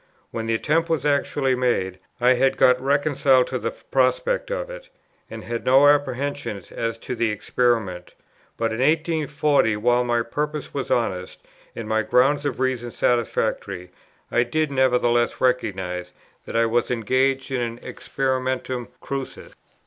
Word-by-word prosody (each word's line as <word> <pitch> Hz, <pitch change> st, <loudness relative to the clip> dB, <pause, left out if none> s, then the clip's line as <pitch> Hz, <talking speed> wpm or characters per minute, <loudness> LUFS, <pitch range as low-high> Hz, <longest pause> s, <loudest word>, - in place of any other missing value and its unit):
When 115 Hz, -1 st, -4 dB
the 115 Hz, -, +1 dB
attempt 165 Hz, +8 st, +1 dB
was 160 Hz, -4 st, 0 dB
actually 140 Hz, -2 st, +1 dB
made, 120 Hz, -7 st, 0 dB, 0.2 s
I 125 Hz, +1 st, +5 dB
had 135 Hz, +1 st, +2 dB
got 125 Hz, 0 st, +4 dB
reconciled 140 Hz, -2 st, +3 dB
to 130 Hz, -, -3 dB
the -, -, -2 dB
prospect 135 Hz, -, 0 dB
of -, -, -3 dB
it, -, -, -10 dB, 0.4 s
and -, -, -8 dB
had 115 Hz, 0 st, -4 dB
no 135 Hz, +3 st, +6 dB
apprehensions 140 Hz, -7 st, 0 dB
as 115 Hz, 0 st, -3 dB
to 120 Hz, -, -6 dB
the 115 Hz, -2 st, 0 dB
experiment; 105 Hz, -4 st, -1 dB, 0.4 s
but 115 Hz, -1 st, 0 dB
in 110 Hz, -, -4 dB
1840, 150 Hz, -5 st, +2 dB
while 120 Hz, +3 st, +2 dB
my 120 Hz, -1 st, +1 dB
purpose 150 Hz, +4 st, -4 dB
was 140 Hz, -2 st, -3 dB
honest, 95 Hz, -6 st, -1 dB, 0.3 s
and 115 Hz, -, -6 dB
my 110 Hz, 0 st, +1 dB
grounds 140 Hz, +6 st, +2 dB
of 140 Hz, -, -2 dB
reason 130 Hz, -2 st, -1 dB
satisfactory, 115 Hz, -6 st, -1 dB, 0.4 s
I 120 Hz, -, +3 dB
did 145 Hz, +5 st, 0 dB
nevertheless 125 Hz, -3 st, +2 dB
recognize 95 Hz, -8 st, -1 dB, 0.3 s
that -, -, -6 dB
I 115 Hz, 0 st, +4 dB
was 115 Hz, +1 st, 0 dB
engaged 130 Hz, +3 st, 0 dB
in 130 Hz, -2 st, 0 dB
an 115 Hz, 0 st, -4 dB
experimentum 130 Hz, -2 st, -2 dB
crucis. 135 Hz, -1 st, -6 dB
125 Hz, 150 wpm, -23 LUFS, 115-140 Hz, 0.4 s, no